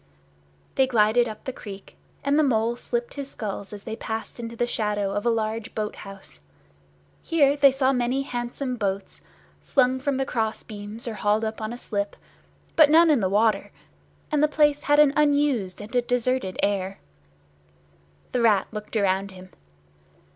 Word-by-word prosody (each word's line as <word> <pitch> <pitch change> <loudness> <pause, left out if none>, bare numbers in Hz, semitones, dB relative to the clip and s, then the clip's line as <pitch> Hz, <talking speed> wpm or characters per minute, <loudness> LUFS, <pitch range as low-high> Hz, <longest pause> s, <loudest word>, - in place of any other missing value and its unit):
They 265 - +3
glided 235 0 +3
up 215 -1 -8
the 260 - -5
creek, 195 -4 -10 0.3
and 280 +2 +2
the - - +5
Mole 235 -3 +1
shipped 240 0 -3
his 280 -1 -6
sculls 200 -4 -6
as 205 -1 -9
they 220 - -5
passed 225 +1 -5
into 230 0 -6
the 240 - 0
shadow 210 -4 -1
of 205 +3 -1
a - - +5
large 225 +1 -2
boat 210 -1 -3
house. 195 - -11 0.8
Here 285 -4 +3
they 285 -1 +6
saw 270 0 +2
many 250 +2 0
handsome 250 0 -4
boats, 200 -2 -3 0.4
slung 260 -1 +2
from 270 0 -1
the 270 - 0
cross 220 -4 -2
beams 210 +2 -8
or 230 - -3
hauled 210 +1 +1
up 220 0 -4
on 215 +1 -3
a 240 - -6
slip, 205 -4 -3 0.6
but 310 -3 +7
none 325 +1 +6
in 290 - +4
the 190 -3 0
water; 210 0 +2 0.6
and 300 -1 +2
the 305 - +5
place 295 -1 +2
had 290 0 +3
an 295 -2 +6
unused 285 -10 +2
and 215 +4 -8
a 245 - +4
deserted 245 -4 -1
air. 195 -1 0 1.3
The 250 - 0
Rat 215 -4 +4
looked 210 +1 -5
around 195 -1 +1
him. 185 -1 -13
230 Hz, 175 wpm, -25 LUFS, 210-265 Hz, 1.3 s, but